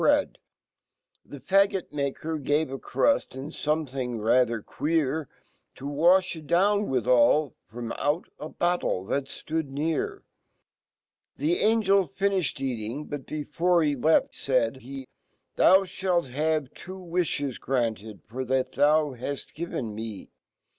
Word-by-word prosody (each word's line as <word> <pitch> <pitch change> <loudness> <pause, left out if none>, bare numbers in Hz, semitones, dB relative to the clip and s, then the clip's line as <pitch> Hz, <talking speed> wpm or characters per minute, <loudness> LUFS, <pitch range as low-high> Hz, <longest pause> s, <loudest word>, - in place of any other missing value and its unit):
bread - - +2 0.8
The 145 - -11
faggt*maker 160 -5 0
gave 145 +1 0
a 135 - -5
cruii 285 - +1
and 135 +3 -7
something 135 -5 -2
rather 115 0 +2
queer 155 -1 -1 0.5
TO 135 - -10
wafKitdownwifhali 155 - +3 0.2
,fromauta 145 +7 -4
battle 175 - 0
fhal 140 +6 -1 0.2
ftoodnear. 160 - -2 1.2
The 335 +4 +1
AngeLtfnifhed 195 -5 +2
eating; 125 +3 -4
Sot 145 - -2
Jbefcrehe 155 -2 0
left 160 +1 +4
,faid 130 -2 0
he, 135 +1 -8 0.5
"Thou, 190 +1 +6
fhalt 180 -5 -1
have 155 0 0
two 185 +2 -9
v/ifhe> 170 -7 -2
granted.'tor 110 - -3
fhat 130 0 0
fea 150 -3 +2
haft 140 -1 -5
given 140 -9 -4
me. 110 -2 -7
145 Hz, 100 wpm, -27 LUFS, 130-170 Hz, 1.2 s, Thou